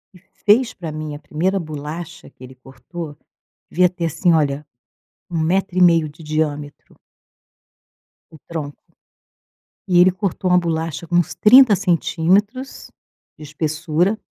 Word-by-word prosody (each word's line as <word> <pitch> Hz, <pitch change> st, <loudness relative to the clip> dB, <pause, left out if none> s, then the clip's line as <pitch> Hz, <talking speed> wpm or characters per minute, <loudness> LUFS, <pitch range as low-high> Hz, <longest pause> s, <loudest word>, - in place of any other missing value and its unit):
E -, -, -16 dB, 0.3 s
fez 230 Hz, +4 st, +4 dB
pra 165 Hz, -4 st, -6 dB
mim, 155 Hz, -1 st, -6 dB
a -, -, -9 dB
primeira 185 Hz, +6 st, -1 dB
bolacha 160 Hz, +2 st, -8 dB
que -, -, -18 dB
ele 130 Hz, +1 st, -11 dB
cortou, 145 Hz, +4 st, -10 dB, 0.5 s
devia 180 Hz, +1 st, +3 dB
ter 175 Hz, -1 st, -4 dB
assim 170 Hz, +3 st, +1 dB
olha, 150 Hz, -2 st, +1 dB, 0.6 s
um 170 Hz, -, -3 dB
1,5 175 Hz, -1 st, +2 dB
de 150 Hz, +2 st, -14 dB
diâmetro 150 Hz, -1 st, -4 dB, 1.4 s
o 160 Hz, -, -14 dB
tronco. 150 Hz, -4 st, -6 dB, 1.1 s
E 180 Hz, -1 st, +3 dB
ele 180 Hz, +1 st, +6 dB
cortou 185 Hz, -1 st, -3 dB
uma 180 Hz, -, +5 dB
bolacha 165 Hz, -1 st, -3 dB
com 175 Hz, -, -1 dB
uns 175 Hz, -, +1 dB
30 240 Hz, -1 st, +6 dB
centímetros 195 Hz, +7 st, 0 dB, 0.5 s
de 155 Hz, -, -10 dB
espessura. 155 Hz, +6 st, -1 dB
165 Hz, 130 wpm, -20 LUFS, 155-185 Hz, 1.4 s, ele